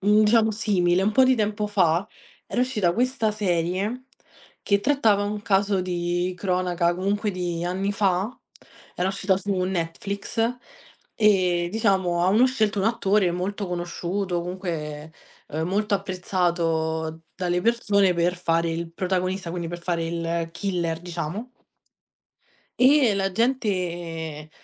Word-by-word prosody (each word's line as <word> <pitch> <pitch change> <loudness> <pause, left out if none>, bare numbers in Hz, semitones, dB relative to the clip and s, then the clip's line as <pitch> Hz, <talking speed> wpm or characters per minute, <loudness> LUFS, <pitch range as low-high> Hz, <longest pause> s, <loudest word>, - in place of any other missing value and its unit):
mhmm, 210 +2 +4
diciamo 220 +1 +4
simile, 190 -4 +2
un 200 - +2
po' 260 +2 +6
di 260 - +4
tempo 210 -2 -1
fa 185 -3 +2 0.4
era 245 - -1
uscita 220 -9 +1
questa 245 0 0
serie, 195 +4 -1 0.6
che 200 - +2
trattava 220 -6 +3
un 210 0 -3
caso 195 -1 +2
di 175 0 -1
cronaca 180 -2 0
comunque 205 +4 -1
di 175 -2 -3
anni 190 +3 -1
fa, 195 -1 +1 0.7
era 180 +1 0
uscita 195 0 +1
su 200 +1 -2
Netflix, 190 +4 -4 0.8
ehm, 185 -5 +3
diciamo 190 -5 +1
avevano 215 +7 +5
scelto 215 -6 0
un 195 - +1
attore 200 -4 +2
molto 195 +3 -3
conosciuto, 175 +1 -2
comunque, 160 -4 -5 0.4
ehm, 160 +2 -2
molto 205 +2 +1
apprezzato 170 -4 -1
dalle 180 -1 -1
persone 200 -4 +2
per 175 +1 +1
fare 165 -1 +1
il 165 0 -4
protagonista, 185 0 -2
quindi 170 0 -4
per 175 +1 -6
fare 170 -1 -1
il 165 0 -2
killer, 170 -3 -2
diciamo 175 +6 -5 1.3
e 260 -4 +5
la 195 -1 -1
gente 175 - -2
185 Hz, 130 wpm, -24 LUFS, 175-205 Hz, 1.3 s, po